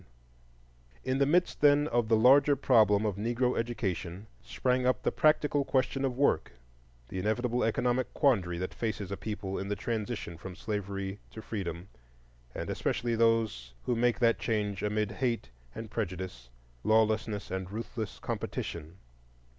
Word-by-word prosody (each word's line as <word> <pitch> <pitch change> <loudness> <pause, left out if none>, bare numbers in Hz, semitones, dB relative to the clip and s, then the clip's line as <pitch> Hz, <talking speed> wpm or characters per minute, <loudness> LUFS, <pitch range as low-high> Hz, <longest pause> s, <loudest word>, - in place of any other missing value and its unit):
In 130 +1 0
the 140 - +4
midst, 175 +4 +2
then, 145 0 +5
of 120 -2 +1
the 110 - +5
larger 140 +5 +6
problem 110 -6 +4
of 100 -3 -1
Negro 120 +4 0
education 100 -5 -3 0.2
sprang 125 0 0
up 130 - +1
the - - +1
more - - -23
practical 150 -2 +3
question 135 0 0
of 130 -2 -1
work, 140 - +2 0.6
the 95 - -4
inevitable 120 +5 0
economic 125 +2 +1
quandary 95 - +2
that 90 +1 -4
faces 105 -4 -3
a - - -1
people 100 -2 -4
in 95 - -4
the 105 - -1
transition 110 -7 -4
from 95 0 -8
slavery 100 -1 -4
to - - -10
freedom, 90 -4 -5 0.7
and - - -4
especially 115 +1 -1
those 110 - +1
who 125 - 0
make 120 +1 +2
that 115 -2 +3
change 105 -4 -1
amid 105 0 0
hate 120 - -2 0.2
and 110 -1 -7
prejudice, 90 - -4 0.3
lawlessness 110 -1 +1
and 95 -1 -3
ruthless 110 0 -5
competition. 85 +2 -5
110 Hz, 150 wpm, -30 LUFS, 100-125 Hz, 0.7 s, larger